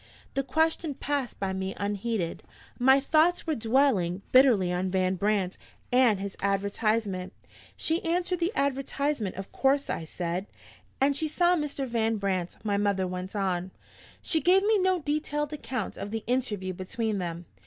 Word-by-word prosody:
The 275 - +1
question 320 +2 0
passed 280 -3 -2
by 195 -1 -1
me 190 0 -3
unheeded: 205 -2 -2 0.4
my 265 +2 +6
thoughts 315 +5 +3
were 320 - 0
dwelling 225 - +2
bitterly 235 -9 +5
on 185 +1 -1
Van 185 0 +1
Brandt 195 -1 0 0.3
and 245 -6 +5
his 195 0 -5
advertisement. 200 -1 0 0.4
"She 325 +2 0
answered 355 +1 0
the 345 +2 +1
advertisement, 275 -4 -1
of 195 +1 -7
course?" 275 +1 +1
I 165 - -3
said. 175 +4 -3 0.5
"And 275 +1 +3
she 315 +3 +1
saw 350 +3 +3
Mr. 295 -4 -2
Van 225 -2 +1
Brandt," 190 -3 -2
my 205 -2 0
mother 200 -2 +1
went 185 +2 -5
on. 185 -2 -1 0.5
"She 320 -3 +1
gave 370 +6 +5
me 430 0 +3
no 370 0 +3
detailed 295 0 -2
account 255 -7 -4
of 200 - -4
the 220 0 -4
interview 210 -7 -1
between 210 +3 -2
them. 170 -1 -4
225 Hz, 155 wpm, -28 LUFS, 190-285 Hz, 0.5 s, my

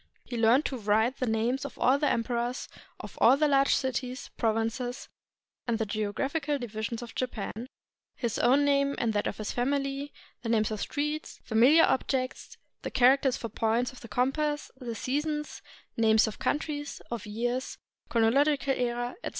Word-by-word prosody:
He 245 - -6
learned 235 +5 +4
to 260 - -3
write 220 +4 +2
the 255 - -1
names 230 +5 0
of 280 - -7
all 265 +3 +3
the 295 - +2
em 230 - +1
perors, 240 +1 -2 0.3
of - - -10
all 270 - +7
the 305 +1 +3
large 275 -1 +4
cities, 255 -1 -3
provinces, 225 +2 -1 0.6
and 235 -1 +1
the 220 - -1
geo 210 0 -2
graphical 290 +5 -1
divisions 230 -1 -4
of 235 - -10
Japan, 235 -1 -4 0.5
his 235 -4 -2
own 270 +4 +4
name 280 0 +2
and 230 -2 0
that 205 - 0
of - - -4
his 215 - -4
family, 275 +2 -1 0.3
the 235 - -4
names 220 -1 +2
of 215 - -3
streets, 300 +1 -3
familiar 255 +9 +5
objects, 260 0 -1 0.2
the - - -4
characters 260 +1 +4
for 230 - -5
points 230 +4 0
of 255 - -14
the 230 - -9
compass; 295 +6 -1
the 245 -3 -6
seasons, 300 +4 -2 0.3
names 220 -1 +4
of 220 - -6
countries, 290 -1 -2
of 230 -2 -4
years, 240 +4 -2 0.3
chronological 275 +5 +3
era, 245 -1 -1
etc. - - -2
250 Hz, 170 wpm, -29 LUFS, 225-280 Hz, 0.6 s, all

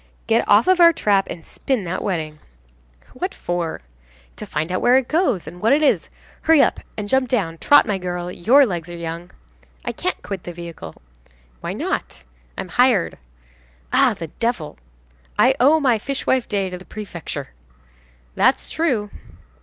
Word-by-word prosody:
"Get 230 0 +2
off 205 +2 +6
of 370 -1 +3
our 340 -1 +8
trap 200 -9 +2
and 165 - -8
spin 260 -7 -2
that 180 +1 -3
wedding." 155 -5 -3 0.7
"What - - -4
for?" 175 -2 -3 0.6
"To - - -7
find 160 +3 -3
out 185 - -1
where 245 +2 +5
it 265 -2 0
goes, 310 - +1
and 175 +3 -10
what 225 +5 +4
it 300 +2 +3
is. 290 - +2 0.3
Hurry 320 -1 +5
up - - +3 0.2
and 210 -1 -4
jump 260 +2 +1
down, 165 -10 -1
trot, 290 - +6
my 205 -4 -1
girl, 180 -1 -4
your 255 +11 +5
legs 175 -6 -4
are 175 - -7
young." 170 +1 -6 0.6
"I - - -1
can't - - -3
quit 195 -3 -5
the 175 - -7
vehicle." 170 -1 -9 0.6
"Why - - -4
not?" - - -4 0.3
"I'm 185 - -5
hired." 245 - +2 0.7
"Ah, - - +4
the 165 -1 -7
devil!" 230 - -2 0.6
"I - - +5
owe 295 +5 +5
my 250 -6 +2
fishwife 260 0 -1
day 195 -3 -1
to 180 - -6
the 185 - -14
prefecture." 200 -6 -7 0.8
"That's - - +2
true." 245 -11 0
205 Hz, 170 wpm, -21 LUFS, 175-255 Hz, 0.8 s, our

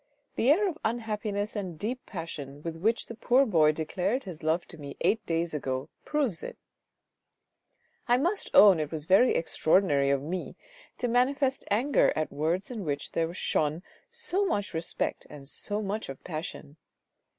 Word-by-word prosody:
" - - -46
The 245 - +2
air 390 +8 +5
of 335 -3 -4
unhappiness 215 -2 -2
and 185 -6 -4
deep 240 +9 -3
passion 150 -6 -7
with 165 -1 -4
which 220 +7 +1
the - - -8
poor 250 +4 +3
boy 160 - +4
declared 185 - -1
his 180 -6 -8
love 160 +3 0
to 165 - -11
me 140 -1 -8
eight 220 0 +2
days 165 0 -1
ago 130 -2 -3 0.2
proves 275 - -1
it; - - -7 1.5
I 245 +1 +5
must 350 +10 0
own 195 -5 +8
it 150 -2 -2
was 155 -2 -4
very 195 +8 +5
extraordinary 160 -4 +2
of 140 -1 +1
me 175 +4 -4 0.4
to 245 - -1
manifest 265 +3 +1
anger 250 +8 +3
at 155 - -1
words 165 - -1
in 225 -5 -4
which 145 -3 -3
there 165 0 0
shone 155 -1 0 0.3
so 465 -5 -2
much 205 - -1
respect 165 0 -2
and 140 -2 -10
so 205 +8 -3
much 205 -1 -3
of 135 - -8
passion. 155 -2 -6
185 Hz, 170 wpm, -28 LUFS, 155-240 Hz, 1.5 s, own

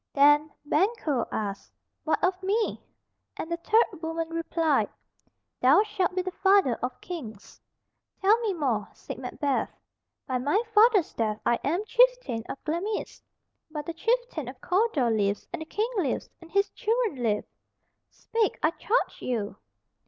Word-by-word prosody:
Then 295 +2 +5 0.2
Banquo 305 - +1
asked, 200 -2 -4 0.3
"What 310 -1 +1
of 370 0 +1
me?" 420 +4 0 0.6
and 320 - -5
the 340 - 0
third 415 -1 +2
woman 325 0 -3
replied, 330 -2 +1 0.7
"Thou 280 +11 +6
shalt 400 -4 -1
be 370 - 0
the 370 - -3
father 385 -8 +4
of 250 +1 -3
kings." 230 - -8 0.6
"Tell 400 +3 +5
me 450 -3 0
more," 255 - -1
said - - -8
Macbeth. 280 -3 -1 0.6
"By 255 -1 -1
my 290 +11 +2
father's 425 -4 +5
death 215 -2 -1
I 235 - +2
am 345 +9 0
chieftain - - +3
of - - -4
Glamis, 350 +7 -3 0.5
but 300 -2 -5
the 335 - -4
chieftain 455 - -1
of 255 0 -8
Cawdor 360 - +1
lives, 205 -2 0
and 350 - -3
the - - -5
King 440 +7 -1
lives, 325 -9 -1
and 335 - -13
his 400 +1 +2
children 445 - -1
live. 210 -3 0 0.6
Speak, 455 -3 -1
I 315 - +4
charge 450 +8 -1
you!" 220 -5 -2
330 Hz, 150 wpm, -27 LUFS, 260-405 Hz, 0.7 s, Thou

